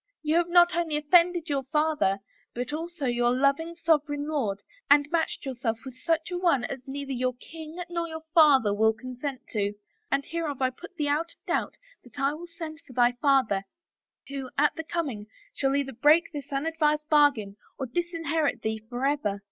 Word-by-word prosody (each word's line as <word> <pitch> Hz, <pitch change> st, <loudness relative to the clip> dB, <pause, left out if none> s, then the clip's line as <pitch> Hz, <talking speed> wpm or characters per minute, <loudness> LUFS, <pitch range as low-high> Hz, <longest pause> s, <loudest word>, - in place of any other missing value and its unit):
You 310 Hz, +1 st, +1 dB
have 345 Hz, 0 st, +2 dB
not 350 Hz, 0 st, +5 dB
only 330 Hz, -3 st, 0 dB
offended 340 Hz, +2 st, +3 dB
your 280 Hz, -3 st, 0 dB
father 300 Hz, -9 st, +1 dB, 0.3 s
but 245 Hz, +3 st, -3 dB
also 330 Hz, -1 st, -4 dB
your 240 Hz, -1 st, +2 dB
loving 280 Hz, +6 st, +1 dB
sovereign 300 Hz, -3 st, +1 dB
lord 215 Hz, -10 st, -2 dB, 0.3 s
and 290 Hz, 0 st, +6 dB
matched 330 Hz, -3 st, -1 dB
yourself 245 Hz, -4 st, -2 dB
with 260 Hz, -, -7 dB
such 320 Hz, +5 st, -1 dB
a 355 Hz, -, -2 dB
one 335 Hz, -9 st, +2 dB
as 265 Hz, +2 st, -4 dB
neither 275 Hz, 0 st, -5 dB
your 255 Hz, -1 st, -1 dB
king 320 Hz, +5 st, -10 dB
nor 340 Hz, -1 st, -2 dB
your 320 Hz, -1 st, -7 dB
father 275 Hz, -10 st, +6 dB
will 220 Hz, +2 st, +3 dB
consent 255 Hz, +3 st, -6 dB
to: 205 Hz, -2 st, -1 dB, 0.2 s
— 435 Hz, -1 st, -45 dB
and 275 Hz, 0 st, +1 dB
hereof 320 Hz, -5 st, -3 dB
I 260 Hz, -1 st, +1 dB
put 350 Hz, +8 st, -12 dB
thee 295 Hz, -3 st, -1 dB
out 320 Hz, +4 st, 0 dB
of -, -, -38 dB
doubt -, -, -1 dB, 0.3 s
that 245 Hz, -1 st, -17 dB
I 275 Hz, +1 st, +2 dB
will 335 Hz, +3 st, -8 dB
send 325 Hz, -2 st, -8 dB
for 315 Hz, -6 st, -15 dB
thy 245 Hz, 0 st, +4 dB
father, 250 Hz, -5 st, +2 dB, 0.7 s
who, 275 Hz, -2 st, -5 dB
at 295 Hz, +1 st, +4 dB
the 320 Hz, -, -4 dB
coming, 280 Hz, -11 st, -3 dB, 0.3 s
shall 270 Hz, 0 st, 0 dB
either 275 Hz, -1 st, -1 dB
break 300 Hz, +8 st, +4 dB
this 290 Hz, 0 st, -7 dB
un 275 Hz, +2 st, -1 dB
advised 305 Hz, -2 st, +1 dB
bargain 280 Hz, -10 st, +3 dB, 0.2 s
or 265 Hz, -, -3 dB
disinherit 330 Hz, +1 st, -1 dB
thee 220 Hz, 0 st, -1 dB
forever.' 245 Hz, -5 st, -1 dB
290 Hz, 190 wpm, -27 LUFS, 255-325 Hz, 0.7 s, and